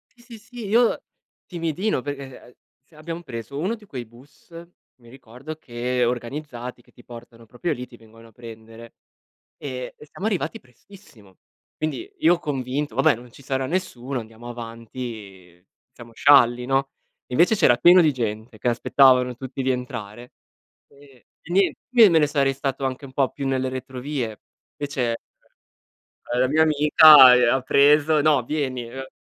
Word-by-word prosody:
Sì, 240 Hz, -, -22 dB
sì, 240 Hz, -2 st, -12 dB
sì, 230 Hz, +1 st, -10 dB
io 230 Hz, +3 st, +2 dB, 0.4 s
timidino 170 Hz, 0 st, -2 dB
perché, 145 Hz, 0 st, -6 dB, 0.2 s
uhm, 125 Hz, -, -19 dB, 0.3 s
se 155 Hz, -, -26 dB
abbiamo 165 Hz, +2 st, -7 dB
preso 120 Hz, -1 st, -8 dB
uno 190 Hz, +9 st, -1 dB
di 215 Hz, -2 st, -18 dB
quei 130 Hz, -10 st, -7 dB
bus, 125 Hz, +9 st, -21 dB, 0.5 s
mi 120 Hz, -, -18 dB
ricordo 130 Hz, +4 st, -11 dB
che 125 Hz, -2 st, -3 dB
organizzati, 125 Hz, 0 st, -5 dB
che -, -, -27 dB
ti 120 Hz, -, -19 dB
portano 115 Hz, -1 st, -13 dB
proprio 120 Hz, +10 st, -4 dB
lì, 125 Hz, -, -7 dB
ti 120 Hz, -1 st, -17 dB
vengono 115 Hz, 0 st, -18 dB
a -, -, -22 dB
prendere 115 Hz, 0 st, -13 dB, 0.6 s
e 130 Hz, -3 st, -7 dB
e 150 Hz, -, -15 dB
siamo 190 Hz, +7 st, -7 dB
arrivati 195 Hz, -7 st, -2 dB
prestissimo. 125 Hz, -, -20 dB, 0.4 s
Quindi 155 Hz, -, -4 dB
io 180 Hz, -, +3 dB
convinto: 135 Hz, -2 st, -4 dB
"Vabbè, 135 Hz, +3 st, +3 dB
non 120 Hz, +1 st, -13 dB
ci 140 Hz, -, -16 dB
sarà 135 Hz, -1 st, -2 dB
nessuno, 135 Hz, -7 st, -4 dB
andiamo 115 Hz, +1 st, -12 dB
avanti, 115 Hz, -6 st, -9 dB, 0.3 s
siamo 120 Hz, -2 st, -14 dB
scialli, 125 Hz, -1 st, +4 dB
no?" 135 Hz, +1 st, 0 dB, 0.4 s
E -, -, -15 dB
invece 175 Hz, -, +4 dB
c'era 120 Hz, -10 st, +4 dB
pieno 175 Hz, +9 st, +6 dB
di 155 Hz, -3 st, +3 dB
gente 110 Hz, -2 st, -5 dB
che 120 Hz, -, -1 dB
aspettavano 125 Hz, +1 st, +3 dB
tutti 130 Hz, +2 st, -7 dB
di 130 Hz, -, 0 dB
entrare. 120 Hz, -2 st, -6 dB, 0.6 s
E 140 Hz, -3 st, -21 dB, 0.2 s
e 175 Hz, -, -9 dB
nien 195 Hz, +2 st, +2 dB, 0.2 s
io 235 Hz, -4 st, +7 dB
me 165 Hz, -2 st, +4 dB
ne 150 Hz, -, +3 dB
sarei 140 Hz, -2 st, +1 dB
stato 135 Hz, 0 st, -3 dB
anche 130 Hz, +1 st, -4 dB
un 135 Hz, -, -12 dB
po' 135 Hz, -1 st, +1 dB
più 140 Hz, -, -6 dB
nelle 130 Hz, -1 st, -1 dB
retrovie. 130 Hz, -2 st, -5 dB, 0.4 s
Invece, 145 Hz, -2 st, -4 dB
ehm, 115 Hz, -, -8 dB, 1.0 s
la 130 Hz, -, +2 dB
mia 155 Hz, +3 st, +3 dB
amica, 150 Hz, -3 st, +8 dB
uhm, 125 Hz, -1 st, +3 dB
ha 135 Hz, -, 0 dB
preso: 150 Hz, +3 st, +4 dB
"No, 145 Hz, -3 st, +3 dB
vieni", 130 Hz, -4 st, -3 dB
ehm 130 Hz, +2 st, -8 dB
130 Hz, 165 wpm, -23 LUFS, 120-150 Hz, 1.0 s, amica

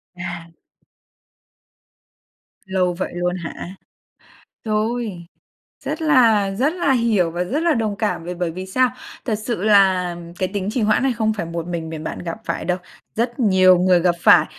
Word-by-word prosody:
À. 175 Hz, -1 st, -6 dB, 2.2 s
Lâu 185 Hz, -2 st, 0 dB
vậy 180 Hz, -, -4 dB
luôn 175 Hz, 0 st, -1 dB
hả? 175 Hz, +1 st, -7 dB, 0.9 s
Rồi, 215 Hz, -4 st, -2 dB, 0.6 s
rất -, -, -3 dB
là 230 Hz, -10 st, +4 dB
rất 275 Hz, +8 st, +1 dB
là 350 Hz, -6 st, +1 dB
hiểu 225 Hz, -9 st, +2 dB
và 175 Hz, +1 st, -1 dB
rất 285 Hz, -, -2 dB
là 340 Hz, -2 st, +3 dB
đồng 220 Hz, -5 st, -1 dB
cảm 205 Hz, -5 st, -2 dB
b -, -, -10 dB
bởi 175 Hz, -2 st, -1 dB
vì 185 Hz, +3 st, -6 dB
sao? 255 Hz, +6 st, +2 dB, 0.4 s
Thật 225 Hz, -, 0 dB
sự 215 Hz, -2 st, -4 dB
là 190 Hz, -4 st, +4 dB, 0.2 s
cái 185 Hz, -, 0 dB
tính 200 Hz, -1 st, -2 dB
trì 245 Hz, -, -1 dB
hoãn 215 Hz, +4 st, +2 dB
này 270 Hz, -, +2 dB
không 220 Hz, -2 st, 0 dB
phải 195 Hz, -5 st, -4 dB
một 170 Hz, 0 st, -5 dB
mình 165 Hz, -2 st, -4 dB
mình 155 Hz, -1 st, -6 dB
bạn -, -, -5 dB
gặp 170 Hz, +3 st, -5 dB
phải -, -, -3 dB
đâu, 180 Hz, 0 st, 0 dB, 0.4 s
rất 240 Hz, +2 st, -1 dB
nhiều 185 Hz, -4 st, +5 dB
người 180 Hz, -1 st, +4 dB
gặp 175 Hz, 0 st, +2 dB
phải. -, -, +7 dB
190 Hz, 175 wpm, -21 LUFS, 175-230 Hz, 2.2 s, phải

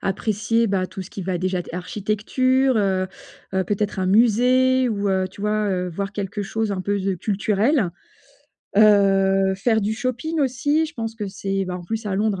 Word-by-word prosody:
apprécier, 215 Hz, +3 st, 0 dB
bah, 190 Hz, -2 st, 0 dB
tout 190 Hz, -, -7 dB
ce 185 Hz, -, -12 dB
qui 195 Hz, -, -7 dB
va 185 Hz, 0 st, -2 dB
déjà 185 Hz, +1 st, -1 dB
être 175 Hz, -, -6 dB
architecture, 220 Hz, +7 st, 0 dB
heu, 190 Hz, -2 st, +1 dB, 0.5 s
heu, 190 Hz, -1 st, +1 dB
peut-être 205 Hz, +1 st, -2 dB
un 185 Hz, -, 0 dB
musée 250 Hz, +5 st, +4 dB
ou, 205 Hz, -2 st, -1 dB
heu, 190 Hz, 0 st, +1 dB
tu 200 Hz, -, -11 dB
vois, 210 Hz, 0 st, 0 dB
heu, 180 Hz, -2 st, -1 dB
voir 195 Hz, +3 st, -4 dB
quelque 205 Hz, 0 st, -4 dB
chose 220 Hz, +1 st, -2 dB
un 185 Hz, -, -3 dB
peu 200 Hz, +2 st, -1 dB
de 195 Hz, 0 st, -1 dB
culturel. 210 Hz, -, +1 dB, 0.9 s
Heu, 195 Hz, -2 st, +4 dB
faire 220 Hz, +3 st, +1 dB
du 215 Hz, +2 st, -1 dB
shopping 255 Hz, +7 st, -3 dB
aussi, 285 Hz, +4 st, +1 dB
je 315 Hz, -, -7 dB
pense 225 Hz, -2 st, -4 dB
que 210 Hz, -3 st, -5 dB
c'est 195 Hz, 0 st, -2 dB
ben 180 Hz, -1 st, -4 dB
en 175 Hz, -, -8 dB
plus, 225 Hz, +4 st, -4 dB
à 195 Hz, -, -1 dB
Londres, 200 Hz, -1 st, 0 dB
205 Hz, 195 wpm, -22 LUFS, 190-225 Hz, 0.9 s, musée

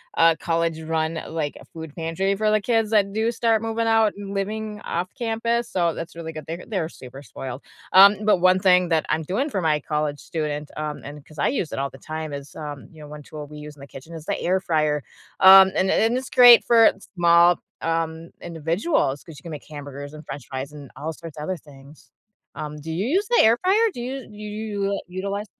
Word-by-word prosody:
uh, 165 Hz, -1 st, +5 dB
college 165 Hz, -1 st, -1 dB
run, 160 Hz, 0 st, -1 dB
like, 155 Hz, -3 st, -3 dB
a -, -, -14 dB
food 160 Hz, -2 st, -10 dB
pantry 175 Hz, +4 st, -1 dB
for 215 Hz, +1 st, +1 dB
the 215 Hz, -, +2 dB
kids 225 Hz, -1 st, +1 dB
that 205 Hz, -2 st, +3 dB
do 220 Hz, +3 st, 0 dB
start 230 Hz, -2 st, +1 dB
moving 225 Hz, 0 st, -1 dB
out 225 Hz, -1 st, +3 dB
and 200 Hz, -1 st, -7 dB
living 210 Hz, +1 st, -3 dB
off 175 Hz, +2 st, -2 dB
campus, 235 Hz, 0 st, -1 dB
so 170 Hz, -3 st, +1 dB
that's 165 Hz, 0 st, -7 dB
really 165 Hz, -1 st, -6 dB
good. 155 Hz, -2 st, -8 dB
They're 165 Hz, +2 st, -6 dB
they're 185 Hz, -8 st, -2 dB
super 135 Hz, -2 st, -12 dB
spoiled. 130 Hz, +2 st, -7 dB, 0.3 s
Um, 200 Hz, +2 st, +8 dB
but, 210 Hz, -3 st, +4 dB
one 185 Hz, +1 st, +4 dB
thing 180 Hz, -1 st, +4 dB
that 160 Hz, -2 st, +1 dB
I'm 155 Hz, +1 st, 0 dB
doing 240 Hz, -, -1 dB
for 195 Hz, -, -2 dB
my 155 Hz, -3 st, +1 dB
college 150 Hz, -1 st, -2 dB
students, 150 Hz, -3 st, -4 dB
um, 150 Hz, -1 st, -4 dB
and 145 Hz, 0 st, -10 dB
'cause 155 Hz, -1 st, -15 dB
I -, -, +2 dB
use 190 Hz, -, -2 dB
it -, -, -3 dB
all 140 Hz, -, -1 dB
the -, -, -14 dB
time 155 Hz, -1 st, -6 dB
is, 140 Hz, 0 st, -8 dB
um, 145 Hz, -3 st, -7 dB
you 155 Hz, -, -14 dB
know, 150 Hz, -, -10 dB
one 150 Hz, -1 st, -9 dB
tool 150 Hz, 0 st, -9 dB
we 150 Hz, +1 st, -11 dB
use 150 Hz, 0 st, -9 dB
in 140 Hz, -, -17 dB
the 140 Hz, -, -10 dB
kitchen 150 Hz, +6 st, -12 dB
is 160 Hz, -2 st, -8 dB
the -, -, -2 dB
air 185 Hz, +2 st, +1 dB
fryer. 155 Hz, -5 st, 0 dB, 0.4 s
Um, 190 Hz, 0 st, +9 dB
and 190 Hz, -, +1 dB
and 225 Hz, +3 st, +2 dB
it's 260 Hz, +1 st, -5 dB
great 245 Hz, -1 st, +8 dB
for 230 Hz, -1 st, +6 dB, 0.2 s
small, 170 Hz, 0 st, +5 dB, 0.2 s
um, 165 Hz, 0 st, -2 dB
individuals, 165 Hz, -, -1 dB
'cause 160 Hz, -4 st, -12 dB
you -, -, -23 dB
can 170 Hz, -, -8 dB
make 150 Hz, -, -7 dB
hamburgers 145 Hz, -1 st, -8 dB
and 155 Hz, 0 st, -10 dB
french 135 Hz, -2 st, -8 dB
fries 135 Hz, +2 st, -5 dB
and 145 Hz, -3 st, -11 dB
all 160 Hz, +2 st, -5 dB
sorts 165 Hz, -2 st, -11 dB
of 150 Hz, -, -5 dB
other 185 Hz, +2 st, -3 dB
things. 140 Hz, 0 st, -17 dB, 0.4 s
Um, 150 Hz, 0 st, -6 dB
do 160 Hz, -, -6 dB
you 175 Hz, +6 st, -2 dB
use 390 Hz, +8 st, +1 dB
the 480 Hz, -, +5 dB
air 225 Hz, +2 st, +5 dB
fryer? 430 Hz, +5 st, +3 dB
Do 240 Hz, -, -6 dB
you 260 Hz, 0 st, -5 dB
do 210 Hz, -1 st, -14 dB
you 210 Hz, -2 st, -3 dB
utilize? 200 Hz, +3 st, -4 dB
170 Hz, 225 wpm, -23 LUFS, 150-210 Hz, 0.4 s, Um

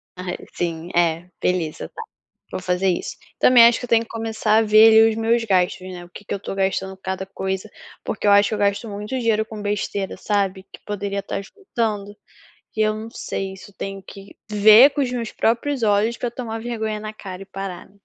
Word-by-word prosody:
Ah 180 Hz, 0 st, -5 dB, 0.2 s
sim, 170 Hz, 0 st, -3 dB
é, 170 Hz, 0 st, +1 dB
beleza 175 Hz, -4 st, -1 dB
tá. -, -, -9 dB, 0.5 s
Vou -, -, -4 dB
fazer 180 Hz, +1 st, 0 dB
isso. 175 Hz, -, -3 dB, 0.2 s
Também 245 Hz, -2 st, +7 dB
acho 235 Hz, -, +3 dB
que -, -, -11 dB
eu -, -, -16 dB
tenho 230 Hz, 0 st, +4 dB
que -, -, -18 dB
começar 225 Hz, -1 st, 0 dB
a -, -, +5 dB
ver 215 Hz, +1 st, +7 dB
ali 225 Hz, 0 st, +7 dB
os 220 Hz, -, -2 dB
meus 230 Hz, +1 st, +2 dB
gastos, 185 Hz, -3 st, +1 dB
né. 180 Hz, -2 st, -8 dB
O -, -, -18 dB
que 200 Hz, -, -12 dB
que -, -, -4 dB
eu -, -, -1 dB
estou 195 Hz, -, -6 dB
gastando 190 Hz, 0 st, -1 dB
cada 190 Hz, 0 st, -4 dB
coisa, 190 Hz, +1 st, -4 dB, 0.4 s
porque 210 Hz, -, -4 dB
eu 205 Hz, -, +5 dB
acho 205 Hz, 0 st, +5 dB
que 215 Hz, -, -1 dB
eu -, -, -4 dB
gasto 200 Hz, +3 st, +1 dB
muito 205 Hz, +1 st, -6 dB
dinheiro 220 Hz, -2 st, +1 dB
com 215 Hz, -1 st, -8 dB
besteira, 205 Hz, -1 st, -2 dB
sabe? 195 Hz, -2 st, -1 dB
Que -, -, -12 dB
poderia 200 Hz, -1 st, -3 dB
estar 195 Hz, 0 st, -4 dB
juntando. 215 Hz, -, -4 dB, 0.6 s
E -, -, -5 dB
eu 215 Hz, 0 st, +2 dB
não 220 Hz, +1 st, -7 dB
sei 190 Hz, 0 st, -5 dB
se 190 Hz, -, -13 dB
eu -, -, -33 dB
tenho 195 Hz, 0 st, -5 dB
que 195 Hz, +1 st, -13 dB
ver 215 Hz, +6 st, +8 dB
com 285 Hz, -, -1 dB
os 250 Hz, -2 st, -1 dB
meus 235 Hz, -3 st, -3 dB
próprios 240 Hz, +3 st, 0 dB
olhos 210 Hz, +3 st, +2 dB
pra 245 Hz, -, -2 dB
eu -, -, -5 dB
tomar 225 Hz, -3 st, -5 dB
vergonha 220 Hz, -3 st, -3 dB
na 215 Hz, 0 st, -5 dB
cara 190 Hz, -3 st, -9 dB
e -, -, -17 dB
parar. 195 Hz, -1 st, -7 dB
205 Hz, 225 wpm, -22 LUFS, 190-225 Hz, 0.6 s, ver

